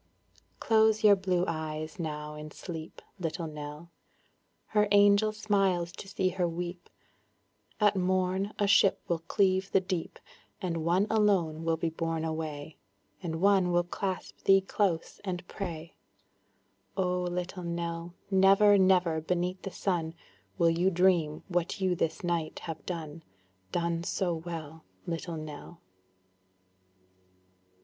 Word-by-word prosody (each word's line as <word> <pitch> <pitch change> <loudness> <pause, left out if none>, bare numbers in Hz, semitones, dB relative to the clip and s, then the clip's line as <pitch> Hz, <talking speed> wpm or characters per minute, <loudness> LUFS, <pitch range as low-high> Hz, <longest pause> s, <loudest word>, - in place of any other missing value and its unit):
Close 220 -1 +3
your 205 -1 +8
blue 185 -2 0
eyes 155 -1 -4
now 150 -2 -4
in 150 0 -8
sleep, 160 0 -8 0.2
Little 170 0 -3
Nell; 150 +2 -8 0.8
Her 210 -1 +3
angel 205 +1 +5
smiles 195 -5 +1
to 195 - -10
see 190 -1 0
her 180 -1 0
weep; 175 +1 -5 0.9
At 210 -1 +4
morn 185 +1 0
a 205 - +2
ship 200 -1 +5
will 170 -1 0
cleave 190 +2 +1
the - - +5
deep, 185 -3 -4 0.4
And 165 -3 -2
one 175 +4 +3
alone 185 -7 +2
will 165 0 +1
be 165 0 -1
borne 165 0 -2
away, 155 -1 -5 0.4
And 160 -1 -4
one 195 -2 +4
will 175 0 +3
clasp 185 +1 -4
thee 195 0 +5
close, 190 -3 -1
and 180 -2 -4
pray; 165 -4 -6 1.0
Oh 180 -1 +1
Little 180 +1 -3
Nell, 170 0 -4 0.2
Never, 195 +2 +6
never 180 -4 +3
beneath 180 +3 -1
the 195 - -5
sun, 170 -4 -2 0.4
Will 170 -2 +4
you 175 +3 +2
dream 175 -4 +2
what 175 -1 -1
you 185 -1 +2
this 165 -1 -2
night 170 -2 -1
have 160 -2 -6
done, 165 -3 -5 0.5
Done 170 -1 -1
so 180 0 -1
well, 160 -1 -7 0.2
Little 170 -1 -4
Nell. 155 +2 -9
175 Hz, 130 wpm, -30 LUFS, 165-190 Hz, 1.0 s, your